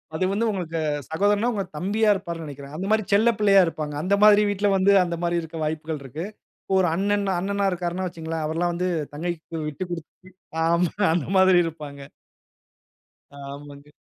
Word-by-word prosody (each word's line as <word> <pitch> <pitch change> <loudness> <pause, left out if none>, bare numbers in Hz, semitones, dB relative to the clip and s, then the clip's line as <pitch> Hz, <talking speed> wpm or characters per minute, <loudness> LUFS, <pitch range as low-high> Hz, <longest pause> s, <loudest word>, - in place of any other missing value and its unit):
அது 185 - 0
வந்து 210 +4 0
உங்களுக்கு 170 -4 -3 0.3
சகோதரன்னா, 205 +7 +2
உங்க 200 -2 -1
தம்பியா 210 +6 +1
இருப்பார்ன்னு 170 -4 -5
நினைக்கிறேன். 140 -1 -9
அந்த 180 +4 -4
மாரி 220 0 +3
செல்ல 220 +4 +5
பிள்ளையா 200 -2 +6
இருப்பாங்க. 155 -2 -4
அந்த 195 +3 +2
மாதிரி 210 0 +7
வீட்ல 205 0 +1
வந்து, 190 +1 +4
அந்த 170 -1 -3
மாரி 175 0 +1
இருக்க 160 0 -8
வாய்ப்புகள் 155 -1 -3
இருக்கு. 150 +6 -6 0.4
இப்போ 195 - -3
ஒரு 180 - +3
அண்ணன்-அண்ணனா 200 0 0
இருக்கிறார்ன்னு 180 +1 -3
வச்சிக்கோங்களேன், 165 -2 -5
அவர்லாம் 170 +3 0
வந்து 180 +2 -1 0.3
தங்கைக்கு 165 +1 -5
விட்டு 150 +4 -4
குடுத்து 165 -3 -6 0.5
ஆமா 170 +1 +2 0.2
அந்த 165 -4 0
மாரி 190 -1 +6
இருப்பாங்க. 150 -4 -7 1.4
ஆமாங்க. 140 +1 -10
175 Hz, 160 wpm, -24 LUFS, 160-195 Hz, 1.4 s, மாதிரி